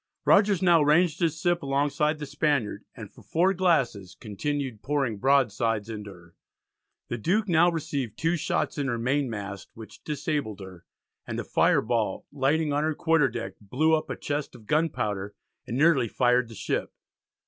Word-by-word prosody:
Rogers 200 -3 +4
now 170 -3 +5
ranged 155 +2 +3
his 165 -3 0
ship 175 0 +1
alongside 145 +2 0
the 150 - -6
Spaniard, 140 -7 -1
and 110 -2 -9
for - - -16
4 180 +4 +1
glasses 135 - 0
continued 130 +2 -4
pouring 135 -7 -1
broadsides 115 -4 +1
into 105 -2 -7
her. 85 -2 -17 0.7
The 120 - -3
Duke 200 - +1
now 175 0 +4
received 150 -7 -3
two 165 +2 +1
shots 155 - -1
in 140 - -1
her 120 -3 -1
mainmast, 115 -6 -2
which 110 -1 -12
disabled 145 -7 -3
her, 95 -3 -11 0.4
and - - -4
a - - -3
fire - - +3
ball 110 -4 -1
lighting 145 +2 +1
on 145 +1 +1
her 155 0 0
quarter 165 -4 +2
deck 115 0 -5
blew 140 +10 +1
up 155 - 0
a - - -3
chest 145 0 -4
of 110 - -15
gunpowder, 105 -10 -1 0.3
and 120 - -3
nearly 145 -5 +4
fired 125 +1 +2
the 115 - -11
ship. - - -2
140 Hz, 170 wpm, -26 LUFS, 110-160 Hz, 0.7 s, now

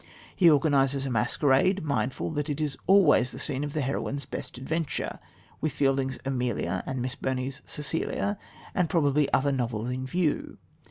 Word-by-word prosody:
He 175 -3 +6
organises 140 -2 +3
a 135 - -2
masquerade, 145 - +2
mindful 140 -1 -1
that 150 -1 -2
it 145 0 -2
is 150 -3 -1
always 185 -9 +5
the - - -8
scene 140 -1 -2
of 145 -1 -4
the 155 - 0
heroine's 140 +1 -2
"best 130 -2 -6
adventure," 155 +4 -3 0.4
with 155 - -1
Fielding's 135 -2 +1
Amelia 125 -8 -1
and 130 -2 -2
Miss 130 0 -2
Burney's 130 +1 -3
Cecilia 165 +6 -2 0.3
and 180 -4 +1
probably 150 -3 +2
other 140 +1 +3
novels 120 -3 -2
in 130 +1 -3
view. 165 +1 -1
140 Hz, 160 wpm, -27 LUFS, 130-155 Hz, 0.4 s, He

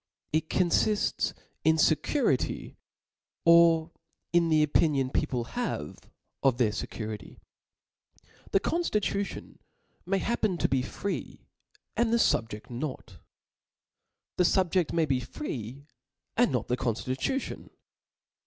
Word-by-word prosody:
It 160 0 +1
confifts 190 +3 +1 0.3
in 160 0 +5
fecurity, 155 - +1 0.7
or 170 -1 +6 0.4
in 170 -1 +4
the 155 -1 +4
opi 155 +2 +3
nion 135 -3 0
people 125 -2 0
have 120 - -5 0.3
of 130 -3 +3
their 115 -4 +3
fecurity. 110 0 -6 1.1
The 195 - +3
conftitcitibn 210 - -1 0.5
may 195 +1 +2
happen 210 -2 0
to - - +2
be 135 -1 +1
free, 195 +9 -5 0.5
and 235 -1 +2
rhc 230 - +3
fubjecl 105 +2 -9
not. 120 - -6 1.2
The 180 - +4
fubjeft 180 -2 +2
may 165 -1 +2
be 135 -4 +1
free, 125 - -6 0.5
and - - +3
not - - -1
the 125 - 0
conftitution. 130 - -2
160 Hz, 110 wpm, -28 LUFS, 125-190 Hz, 1.2 s, or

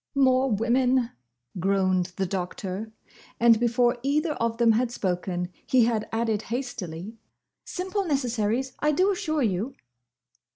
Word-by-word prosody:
"More 265 -1 +4
women!" 245 +3 +2 0.5
groaned 185 -1 +1
the 190 - 0
Doctor; 190 +3 -4 0.5
and 230 -1 +6
before 240 +1 +2
either 300 +4 +1
of 230 -3 -1
them 235 -1 +5
had 235 +2 +2
spoken 180 -4 -2 0.2
he 250 -3 +5
had 225 -2 -1
added 225 -2 0
hastily, 225 -5 -5 0.5
"Simple 380 +2 -2
necessaries, 250 - 0
I 300 0 +2
do 370 +7 +3
assure 310 -6 -1
you!" 215 +5 -1
235 Hz, 125 wpm, -26 LUFS, 200-260 Hz, 0.5 s, and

